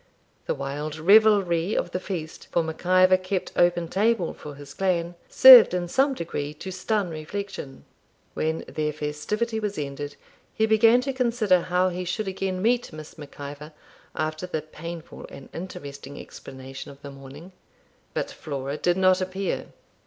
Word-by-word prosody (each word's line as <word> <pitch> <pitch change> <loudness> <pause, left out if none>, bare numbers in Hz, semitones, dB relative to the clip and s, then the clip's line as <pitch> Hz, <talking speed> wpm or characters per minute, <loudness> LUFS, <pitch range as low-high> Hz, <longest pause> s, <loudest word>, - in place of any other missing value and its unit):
The - - 0
wild 145 +3 -4
revelry 195 -1 +4
of 175 - -1
the 180 - -2
feast, 170 -5 -6
for 170 - +2
Mac 160 0 -6
Ivor 185 0 +6
kept 185 0 -3
open 175 -1 +2
table 200 0 +1
for 150 -1 -10
his 140 0 -11
clan, 175 -3 0 0.2
served 250 -8 +10
in 175 -1 -2
some 270 +8 +2
degree 150 - -4
to 190 +5 -7
stun 190 0 -1
reflection. 160 -3 -6 0.5
When 160 +1 -2
their 150 -1 -2
festivity 180 +10 -2
was 210 -2 -3
ended, 145 0 -5 0.4
he 220 - +3
began 225 +2 +5
to 270 +1 -3
consider 230 -7 +2
how 180 +1 +1
he 180 0 -4
should 195 +4 -3
again 190 -1 -3
meet 245 +2 +1
Miss 155 -1 -10
Mac 145 -1 -12
Ivor 145 +2 -8 0.4
after 155 +3 -3
the 155 -4 -3
painful 165 +1 -9
and 135 - -12
interesting 145 -6 -8
explanation 130 0 -10
of 140 0 -14
the 140 - -8
morning. 140 +6 -12 0.6
But - - -2
Flora 140 -1 -5
did 175 +2 +1
not 185 0 +4
appear. 190 +1 -3
175 Hz, 160 wpm, -25 LUFS, 150-195 Hz, 0.6 s, served